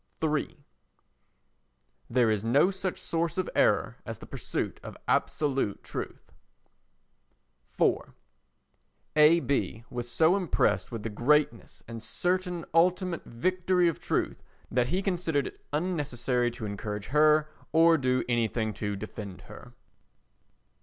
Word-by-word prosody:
iii 150 -2 -1 1.4
There 120 -2 +3
is 105 -1 0
no 140 +11 +4
such 190 -1 -3
source 165 +2 -2
of 185 - 0
error - - +2
as - - -6
the - - -11
pursuit - - -4
of - - -9
absolute 135 -8 0
truth. - - -7 1.5
iv - - +1 1.0
A. 155 +2 +7
B. 130 -6 -1
was 120 -1 -4
so 160 +9 +4
impressed 160 - +1
with 115 -3 -5
the 115 - -3
greatness 125 +1 +1
and 115 -1 -7
certain 180 - -1
ultimate 180 +1 +2
victory 180 +7 +1
of 165 - -1
truth - - -1 0.3
that 125 0 +2
he 185 +7 -1
considered 170 -7 0
it - - -9
unnecessary 140 -7 0
to 120 -2 -7
encourage 105 0 -5
her 155 0 +4 0.2
or 165 +1 +6
do 130 -1 +1
anything 115 -2 0
to 105 -1 -3
defend 100 -1 -7
her. - - -13
145 Hz, 125 wpm, -28 LUFS, 115-170 Hz, 1.5 s, A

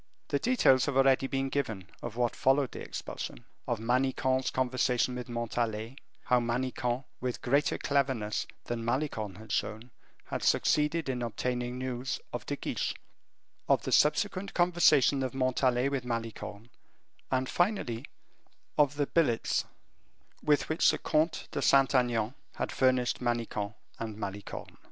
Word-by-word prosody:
The 140 - +1
details 140 - +4
have 140 -2 0
already 135 0 +4
been 135 0 -1
given 110 -10 -2 0.2
of 120 -2 -6
what 120 -1 0
followed 135 0 +2
this - - -7
expulsion; - - -6 0.2
of 120 - 0
Manicamp's 130 +2 +1
conversation 125 -1 +1
with 125 0 -6
Montalais; 115 0 -2 0.3
how 125 - +3
Manicamp, 125 +1 -1 0.2
with 125 -1 -3
greater 140 +4 +2
cleverness 130 -7 0 0.2
than 120 -1 -3
Malicorne 115 -5 -1
had 110 -1 -10
shown, 110 +3 -2 0.3
had - - -4
succeeded 150 +1 +2
in 125 -2 -2
obtaining 125 +1 -2
news 130 0 -3
of - - -5
De - - -1
Guiche, - - -2 0.7
of - - +4
the - - -3
subsequent 195 +5 +2
conversation 165 -6 +4
of 130 -1 -2
Montalais 130 -1 +2
with 135 -3 -2
Malicorne, 115 -2 -5 0.6
and, 130 0 +1
finally, 175 - 0 0.8
of 145 -1 +4
the 145 0 +1
billets 140 -8 +1 0.8
with 150 -1 +2
which 155 - +4
the - - +2
Comte 155 +2 0
de - - -2
Saint 135 0 +5
Aignan 120 -3 +2 0.2
had - - -2
furnished 130 -2 +2
Manicamp 115 -3 -2 0.2
and 110 -2 -5
Malicorne. 100 -1 -6
125 Hz, 140 wpm, -30 LUFS, 115-135 Hz, 0.8 s, Saint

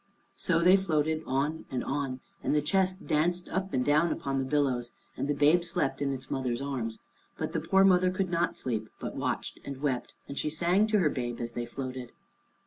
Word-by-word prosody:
So 165 -2 +2
they 180 +3 +7
floated 160 -4 0
on 145 +4 -1
and 130 - -2
on, 135 -2 -2 0.2
and - - 0
the 150 - +3
chest 190 +3 +1
danced 175 +4 +1
up 190 +1 -2
and 125 -1 0
down 155 +3 +3
upon 135 0 -2
the - - 0
billows, 130 -3 0 0.2
and - - -2
the 145 - +1
babe 150 +5 +4
slept 140 -5 0
in 140 -1 +1
its 130 -1 -6
mother's 125 -3 -1
arms. 130 -5 -3 0.4
But - - -3
the - - +1
poor 195 0 +4
mother 185 -1 +5
could 185 0 -1
not 170 0 0
sleep, 110 -4 -3
but - - -5
watched - - -3
and 140 -1 -6
wept, 135 -4 -2
and 140 - -4
she - - 0
sang 175 +7 +2
to 215 -1 +3
her 175 -7 +3
babe 120 -2 -3
as 120 0 -4
they 120 0 -3
floated. 130 -1 -6
145 Hz, 210 wpm, -29 LUFS, 130-175 Hz, 0.4 s, they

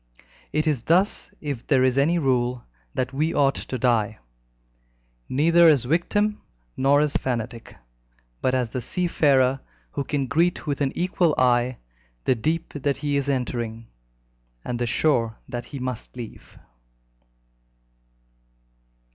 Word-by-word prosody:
It 155 +1 0
is 150 -6 +1
thus, 180 - +2
if 140 -6 -5
there 135 -4 +4
is 130 -1 +3
any 150 +6 +3
rule, 125 -4 0 0.3
that 130 +1 -1
we 155 +4 0
ought 135 -1 +4
to 130 - -5
die 115 -3 +1 1.1
neither 165 +5 +5
as 145 -6 +5
victim 205 - +1 0.3
nor 140 +2 +4
as 150 -1 0
fanatic, 120 -2 -3 0.6
but 130 - +1
as 125 -3 -1
the 125 - -3
seafarer 135 -4 +2 0.3
who 140 - -2
can 140 0 -1
greet 170 +8 +1
with 145 -2 -2
an 135 -1 +1
equal 175 -3 +1
eye 125 0 +2 0.5
the - - +3
deep 155 +8 -2
that 145 -1 -1
he 145 -1 -1
is 140 0 0
entering, 120 -4 -3 0.8
and 120 -1 -3
the 120 - 0
shore 115 -3 +1
that 120 0 -5
he 140 - -8
must 125 -2 -5
leave. 120 -3 -10
135 Hz, 135 wpm, -24 LUFS, 125-155 Hz, 1.1 s, neither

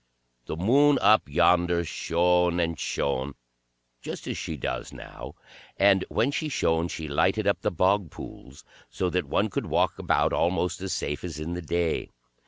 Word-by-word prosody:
The - - -3
Moon 140 - +4
up 110 -8 +4
yonder 85 +2 +3
shone 90 +2 +1
and 85 -1 -1
shone, 70 0 -2 0.7
just - - -7
as - - -3
she 80 - -5
does 65 - -4
now, - - -10 0.4
and 100 -1 +4
when 135 - +1
she 155 +2 -2
shone 80 - +1
she 80 -2 -6
lighted 95 +8 +1
up 100 -4 +1
the - - +1
bog 95 +1 +1
pools, 65 -1 -11 0.2
so 90 -1 -2
that 90 0 0
one 105 0 +1
could - - -3
walk - - +1
about - - +1
almost 90 0 0
as 95 -1 -4
safe 75 +2 -3
as 85 -4 -6
in 80 +3 -4
the 90 - -4
day. 85 0 -1
90 Hz, 170 wpm, -26 LUFS, 80-95 Hz, 0.7 s, Moon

